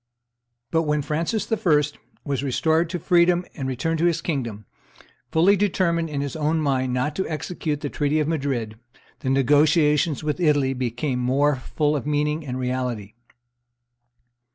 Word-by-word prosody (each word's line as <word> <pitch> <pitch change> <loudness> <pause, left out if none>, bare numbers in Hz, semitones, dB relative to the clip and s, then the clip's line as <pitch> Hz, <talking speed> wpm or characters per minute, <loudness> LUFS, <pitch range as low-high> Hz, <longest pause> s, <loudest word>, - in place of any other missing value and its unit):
But 165 - +3
when 150 -2 0
Francis 165 +11 -2
I. 180 -9 +3 0.4
was 140 -3 -1
restored 160 +5 +1
to 175 - -2
freedom 175 +1 +3
and 135 -3 -4
returned 155 +6 -1
to 170 - +2
his 170 -2 +2
kingdom, 120 - -3 0.7
fully 175 +5 +5
determined 175 -4 +1
in 140 -2 -2
his 140 +1 -4
own 155 +1 0
mind 130 -4 0
not 130 +4 -1
to 190 - -1
execute 155 -1 -3
the 145 - -3
treaty 150 +1 0
of 150 - 0
Madrid, 135 -8 -2 0.4
the 130 - -3
negotiations 150 +3 +3
with 150 +3 -2
Italy 145 -5 +2
became 125 +1 -2
more 135 +4 +2
full 150 +3 -1
of 145 - -3
meaning 150 +1 0
and 125 0 -3
reality. 125 -5 -3
150 Hz, 155 wpm, -23 LUFS, 130-165 Hz, 0.7 s, fully